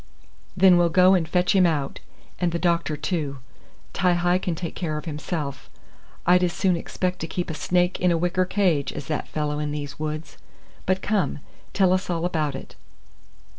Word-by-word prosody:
"Then 185 -1 +6
we'll 170 -1 +3
go 185 +2 +5
and 165 -4 +1
fetch 180 +1 +2
him 185 -2 +6
out, 145 -4 -2 0.4
and 175 -1 +1
the 170 - -1
doctor 170 -3 0
too. 150 -5 -2 0.6
Ti 180 0 +2
hi 175 +1 +2
can 175 -2 -2
take 170 0 -5
care 155 -4 -3
of 150 - -6
himself. 150 -2 -4 0.6
I'd 180 +1 +5
as 175 -1 +1
soon 185 -3 +2
expect 180 +2 -3
to 165 - -4
keep 175 +1 -3
a - - -4
snake 180 +3 +1
in 180 - +3
a 170 - +2
wicker 180 +2 +1
cage 175 -8 +1
as 145 - -7
that 155 - -3
fellow 150 -1 -2
in 150 0 -2
these 145 -1 -5
woods; 155 +1 -5 0.5
but 185 0 +1
come, 205 -2 0 0.4
tell 190 -2 +4
us 185 +1 -1
all 170 -1 -1
about 155 -5 -1
it." - - -9
175 Hz, 190 wpm, -24 LUFS, 155-180 Hz, 0.6 s, Then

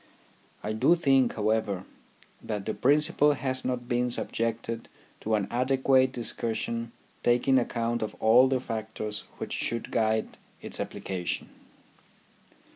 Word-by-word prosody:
I 105 - -2
do 135 +10 +4
think, 135 -7 +3
however, 105 -3 0 0.6
that 105 -3 -4
the 110 - -1
principle 145 +2 +3
has 130 -1 -3
not 125 -1 -2
been 125 0 +1
subjected 115 -1 -3 0.3
to 110 0 0
an 100 -2 0
adequate 130 +1 +3
discussion 115 -1 -3 0.3
taking 125 +2 +4
account 120 -1 -1
of 110 - -3
all 120 +4 +6
the 130 -1 +1
factors 110 -3 -5
which - - -5
should 115 -1 -2
guide 110 -1 0 0.2
its - - -6
application. 90 -2 -3
115 Hz, 120 wpm, -28 LUFS, 110-130 Hz, 0.6 s, all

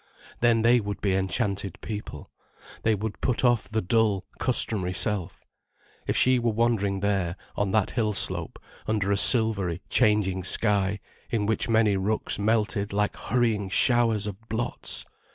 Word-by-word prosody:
Then 115 -1 +3
they 120 +1 +5
would 105 -2 -5
be 100 -2 0
enchanted 95 0 -1
people, 105 -1 -7 0.5
they 110 -1 +2
would 105 +1 -5
put 130 0 0
off 120 -2 +2
the 110 0 -1
dull, 105 -1 +1
customary 105 -7 +1
self. 100 -3 -2 0.6
If - - 0
she 130 0 +4
were 120 -1 0
wandering 105 -4 0
there, 95 -4 0 0.2
on 100 -1 -1
that 105 0 +1
hill 110 -3 0
slope - - -1 0.3
under 105 -2 0
a - - +3
silvery, 100 -7 +3
changing 100 -3 +2
sky, 100 0 0 0.3
in 105 -3 -1
which 110 +2 -1
many 110 -3 +3
rooks 105 +2 -1
melted 105 -1 0
like 105 0 0
hurrying 110 -4 -1
showers 115 -1 +2
of 100 -3 -5
blots! 110 +2 -3
105 Hz, 150 wpm, -26 LUFS, 100-115 Hz, 0.6 s, they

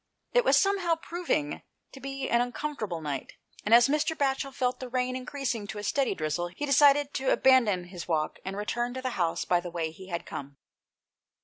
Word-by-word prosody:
It - - +5
was - - +5
somehow 390 -4 +2
proving 330 - -2 0.3
to 270 - -11
be 275 0 -4
an 235 - +3
uncomfortable 245 - -3
night, 145 -3 -4 0.3
and 210 - -3
as 235 +2 +8
Mr. 305 +3 0
Batchel 275 0 0
felt 250 -1 -1
the 255 - -6
rain 255 0 0
increas 260 +1 -2
ing 215 -3 -6
to 210 - -6
a 205 - -5
steady 270 +5 +1
drizzle 155 +2 -2
he 175 +12 -5
decided 285 0 +5
to 265 -1 0
abandon 235 -9 +4
his 175 0 -9
walk 155 -3 -1
and 190 +1 -5
to - - -7
return 240 +4 -2
to 260 - -4
the 255 - -1
house 170 -7 -1
by 175 - +3
the 175 0 -6
way 165 -2 -3
he 185 +4 -12
had 170 -2 -4
come. 140 0 -7
245 Hz, 210 wpm, -28 LUFS, 175-275 Hz, 0.3 s, as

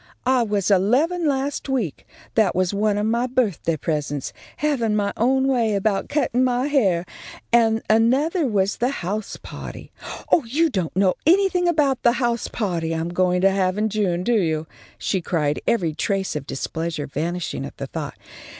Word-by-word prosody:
"I 255 0 +3
was 205 -3 0
eleven 280 - +2
last 275 0 -1
week. 230 - -2 0.3
That 215 -5 +2
was 185 +1 +1
one 205 0 +1
of 210 - 0
my 235 +3 +1
birthday 210 -10 0
presents, 145 -2 -3 0.2
havin' 250 -8 0
my 200 -1 0
own 265 +3 +2
way 235 -5 +2
about 200 0 0
cuttin' 255 -4 +1
my 250 0 +1
hair, 200 - +2 0.5
and 225 -1 +4
anothah 270 - +3
was 200 -2 +1
the 245 +2 +1
house 210 -4 -4
pahty. - - -9 0.4
Oh, 320 - +5
you 300 +7 +1
don't 180 -8 -2
know 190 -1 +4
anything 365 0 +4
about 295 -6 +2
the 235 - +4
house 240 -2 -1
pahty 170 -7 -2
I'm 165 +1 -2 0.3
to 195 +1 +5
have 190 0 0
in 215 +1 +1
June, 190 -4 0
do 240 - +1
you!" 160 -2 -1 0.3
she 190 - -1
cried, 150 -4 -1
every 180 -9 +1
trace 195 +3 -1
of 145 -2 -5
displeasure 160 +2 -3
vanishing 170 +5 -3
at - - -8
the - - -4
thought. - - -6
215 Hz, 170 wpm, -22 LUFS, 180-255 Hz, 0.5 s, Oh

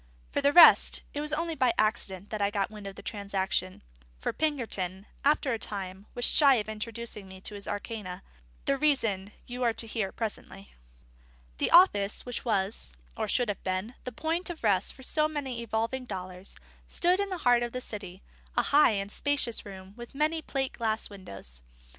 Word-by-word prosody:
For 285 - 0
the 280 0 +4
rest, 345 +2 +8
it 290 - -2
was 300 0 0
only 330 +2 -1
by 255 -6 +2
accident 210 -2 0
I 200 -2 +1
got 205 -1 -1
wind 210 -2 -8
of 195 - -7
the - - -11
transaction; 195 -3 -2 0.4
for - - -2
Pinkerton, 210 - -2 0.2
after 285 -2 +3
a 225 - -2
time, 195 -1 -6
was 245 - +3
shy 280 -3 +7
of 215 -3 -1
introducing 220 -1 -6
me 190 0 -11
to 210 - -6
his 200 -1 -8
arcana: 205 -3 -5 0.4
the 275 - +2
reason 225 -10 +1
you 245 +1 -6
are 235 -2 +3
to - - -4
hear 215 -3 -2
presently. 200 -3 -6 0.9
The - - +2
office 210 - +5
which 245 -1 -4
was 195 - -1 0.2
(or - - -2
should 245 -3 +1
have 205 - -3
been) 185 +5 -2
the 250 - -5
point 325 +8 -2
of 335 -6 -7
rest 200 -4 +2
for 265 - -14
so 305 +3 +2
many 270 -6 -4
evolving 230 +3 -2
dollars 185 -2 -7 0.3
stood 360 +2 +3
in 400 0 0
the 370 - -3
heart 245 -1 +5
of 240 0 -2
the 255 - -3
city: 200 -6 -7 0.3
a - - +4
high 285 -5 +5
and 200 0 -3
spacious 280 -6 0
room, 190 0 -10
with 240 +2 -10
many 310 +3 +1
plate 270 -3 -2
glass 220 -2 -1
windows. 95 - -8
220 Hz, 185 wpm, -29 LUFS, 195-270 Hz, 0.9 s, rest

